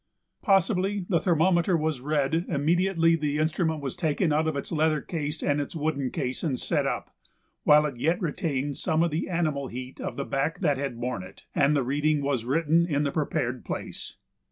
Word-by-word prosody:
Possibly 195 -1 +2
the 170 -4 +2
thermometer 175 +1 +3
was 155 -4 -1
read 145 0 0
immediately 165 +2 +2
the 150 -2 -1
instrument 160 0 0
was 135 -3 -4
taken 155 +1 +1
out 155 +1 +2
of 160 - -1
its 140 - -4
leather 155 -1 +2
case 150 0 -4
and 145 0 +1
its 145 - -6
wooden 150 -4 -1
case 130 0 -3
and 135 -7 -1
set - - 0
up, - - -4 0.5
while 150 0 +6
it 140 -5 -4
yet 165 - +1
retained 145 -5 -2
some 160 +1 +1
of 170 - 0
the 155 +5 -2
animal 155 -6 -1
heat 125 +1 -7
of - - -4
the 140 - -2
back 145 +4 -1
that 145 -6 +2
had 135 -4 -3
borne 125 -4 -2
it, 95 +1 -13
and 145 +1 +3
the 140 - +2
reading 145 +3 +1
was 135 -5 -1
written 165 +5 +2
in 145 -3 +1
the 140 - 0
prepared 130 -5 -1
place. - - -6
150 Hz, 195 wpm, -27 LUFS, 140-165 Hz, 0.5 s, while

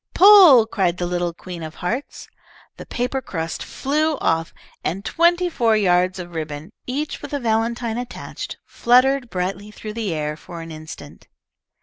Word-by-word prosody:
"Pull!" 365 - +9
cried 185 -6 0
the 175 - -2
little 175 0 -1
Queen 175 0 -9
of 155 0 -7
Hearts. 240 +10 -4 0.5
The - - -10
paper 250 +2 -2
crust 165 -8 -4
flew 305 +2 -1
off, 165 0 0 0.3
and 195 +5 -3
twenty 345 +2 +3
four 230 -9 +2
yards 185 -2 +2
of 175 -1 -8
ribbon, 155 +2 -6 0.2
each 290 +4 -3
with - - -8
a - - -1
valentine 230 0 -1
attached, 245 0 -7
fluttered 255 +1 +3
brightly 190 +2 -3
through 210 0 -8
the 220 -4 -3
air 150 -1 -2
for 170 +2 -10
an 165 0 -9
instant. 155 0 -11
210 Hz, 155 wpm, -21 LUFS, 175-255 Hz, 0.5 s, Pull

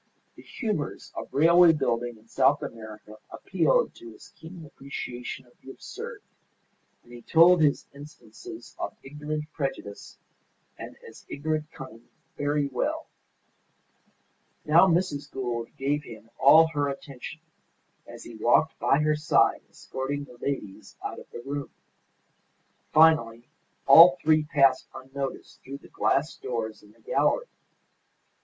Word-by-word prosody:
The - - -14
humours 210 - -4
of - - -7
railway 170 +3 +6
building 120 -5 -2
in 110 +1 -23
South 140 +4 +2
America 110 -4 -10
appealed - - 0
to 345 -1 -12
his 375 - -16
keen 165 0 -12
appreciation 130 -3 -7
of 120 - -25
the - - -13
absurd, - - -9 0.8
and 120 - -17
he 120 - -11
told 170 +6 +5
his 145 -2 +2
instances 140 -6 -12
of - - -5
ignorant 150 +2 -6
prejudice 135 -8 -6 0.6
and - - -10
as - - -14
ignorant 155 +1 -3
cunning 115 -3 -12 0.3
very 145 0 0
well. 130 -3 -3 1.6
Now, 165 +5 +6
Mrs. 155 -5 0
Gould 120 -3 -4
gave 145 +2 -1
him 115 -4 -13
all 160 +4 +7
her 145 -2 -1
attention 140 +2 -8 0.7
as - - -11
he 120 - -11
walked 120 +8 +2
by 140 - +2
her 155 0 +2
side 150 +1 +2
escorting 140 +2 -5
the 125 -3 -15
ladies 125 -9 -5
out - - -5
of - - -15
the 120 - -9
room. 140 0 -4 1.2
Finally 125 -8 +4 0.4
all 170 +6 +9
three 155 -1 +2
passed 135 -3 +3
unnoticed 135 +1 -7
through 135 +1 -8
the - - -18
glass 145 +4 0
doors 115 -3 -5
in 105 - -19
the 115 +1 -26
gallery. - - +1
140 Hz, 135 wpm, -26 LUFS, 120-155 Hz, 1.6 s, all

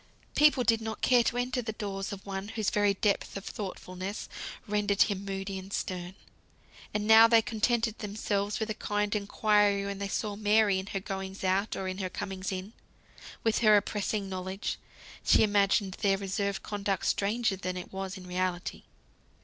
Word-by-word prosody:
People 295 -4 +5
did 225 -1 +3
not 220 -1 -5
care 250 -2 +5
to 235 +1 0
enter 250 0 0
the 220 -2 -4
doors 200 -2 -4
of 195 -1 -7
one 195 0 -4
whose 215 -1 -1
very 205 -1 +2
depth 200 0 0
of 195 - -8
thoughtfulness 190 0 -5 0.4
rendered 205 -1 +3
him 200 -2 -3
moody 195 0 -4
and 190 +1 -11
stern. 180 -1 -4 0.8
And 210 0 -1
now 220 +1 +9
they 230 -1 +5
contented 225 0 0
themselves 205 -1 -2
with 220 0 -2
a - - 0
kind 210 0 -1
inquiry 205 -1 +2
when 200 0 -4
they 200 - -2
saw 205 +1 -2
Mary 210 -1 +3
in 190 - -6
her 195 - -3
goings 190 0 -5
out 190 +3 +1
or 190 - -3
in 185 +1 -4
her 185 -2 -2
comings 195 0 -4
in. 190 +3 -5 0.7
With 225 -1 +2
her 215 -2 +6
oppressing 205 0 -1
knowledge, 190 +1 -4 0.4
she - - +5
imagined 200 -1 +2
their 195 -1 +3
reserved 200 0 -2
conduct 200 -2 -2
stranger 210 +1 +1
than 185 -1 -4
it 180 - -8
was 195 0 -4
in 185 - -10
reality. 180 0 -2
200 Hz, 175 wpm, -29 LUFS, 195-215 Hz, 0.8 s, now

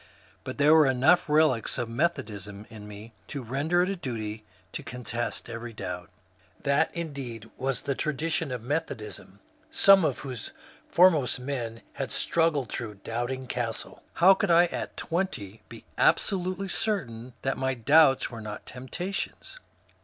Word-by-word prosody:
But - - -6
there 145 +2 +6
were 155 -3 +7
enough 140 +7 +4
relics 150 -6 +3
of 120 - -1
Methodism 105 - -2
in 105 -2 -10
me 105 +2 -10
to 140 -3 -5
render 145 +9 +1
it 185 - -1
a - - -2
duty 110 - -5 0.3
to - - -5
contest 120 0 -4
every 115 0 -6
doubt. 90 -4 -6 0.5
That 140 +3 +3
indeed 135 -9 -6
was 135 -1 -2
the 140 - -1
tradition 155 +1 -1
of 125 -3 -4
Methodism, 130 - -4 0.3
some 195 -2 +6
of - - +1
whose 125 -6 -7 0.4
foremost 165 -9 +4
men 125 -4 -4
had - - -4
struggled 160 -7 +1
through 110 -3 -5
Doubting 120 +3 -3
Castle. 120 -2 -4
How 185 +3 +7
could 200 0 -1
I 170 +1 +7
at - - -5
twenty 130 - -3
be - - -11
absolutely 185 0 +2
certain 130 - -2
that 135 0 -1
my 130 0 0
doubts 135 +3 +5
were 115 -2 -7
not 105 -1 -7
temp 125 +1 -9
tations 195 - -4
130 Hz, 150 wpm, -28 LUFS, 115-160 Hz, 0.5 s, were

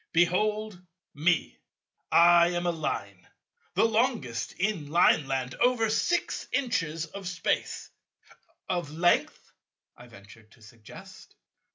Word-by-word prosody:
Behold 205 +3 +1 0.3
me—I 170 +1 +2
am 175 0 -2
a 175 - +2
Line, 100 - -5 0.5
the - - +4
longest 225 - -1
in 185 -7 -2
Lineland, 135 -5 +2
over 240 -3 +2
six 350 +9 -1
inches 175 - -1
of 190 +4 -9
Space—" 170 -2 -3 0.8
"Of 175 -5 -2
Length," 170 +3 0 0.4
I 120 - -15
ventured 110 0 -16
to 115 - -21
suggest. 110 -1 -14
170 Hz, 100 wpm, -27 LUFS, 135-210 Hz, 0.8 s, the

